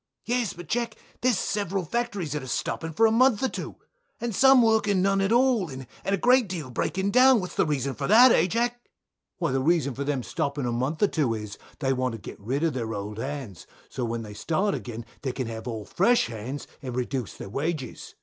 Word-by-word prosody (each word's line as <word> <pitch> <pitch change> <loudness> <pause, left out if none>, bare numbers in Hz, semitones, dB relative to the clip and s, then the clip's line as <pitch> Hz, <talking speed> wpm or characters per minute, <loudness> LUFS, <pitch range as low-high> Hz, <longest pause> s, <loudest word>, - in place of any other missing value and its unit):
Bill. 245 +2 +1
Yes, 230 -6 -2
but 175 0 -10
Jack, 230 +3 -1 0.3
there's 245 -4 +3
several 195 -3 -1
factories 205 - -2
that's 140 -4 -4
stopping 165 0 -2
for 225 +8 +3
a 220 - +4
month 250 0 +4
or 265 - +2
two, - - -6 0.4
and 235 -1 -3
some 265 +3 +6
working 215 -4 +3
none 195 0 +2
at 195 +2 +1
all, 240 -6 +3
and 130 -1 -7 0.2
a 200 0 +1
great 245 0 +4
deal 160 -8 -5
breaking 190 +10 -1
down; 255 +1 +6
what's 180 -2 -5
the - - +1
reason 140 -2 -1
of 130 - -11
that, 240 +4 +8
eh 170 - +4
Jack? - - -10
Jack. 240 +3 0 0.6
Why 170 -6 -1
the 135 0 +1
reason 155 -1 +2
of 140 - -2
them 140 -4 -1
stopping 140 +1 -2
a 120 - -1
month 130 - -1
or - - +6
two 140 -11 0
is, 105 -2 -7 0.2
they 135 -2 0
want 130 -1 -1
to - - -5
get - - -10
rid 130 +9 -2
of 165 -3 +1
their 115 -3 -3
old 105 +2 -5
hands; 130 -8 -6 0.2
so - - -6
that - - +1
when 115 0 -3
they 105 -1 -9
start 170 - 0
again 120 -1 -6 0.2
they 135 - -2
can 130 -1 -3
have 115 +1 -6
all 110 -3 -4
fresh 235 - +3
hands, 120 +5 -6 0.2
and 125 -3 -5
reduce 125 -2 -3
their - - -8
wages. 150 - -4
155 Hz, 230 wpm, -26 LUFS, 125-215 Hz, 0.6 s, that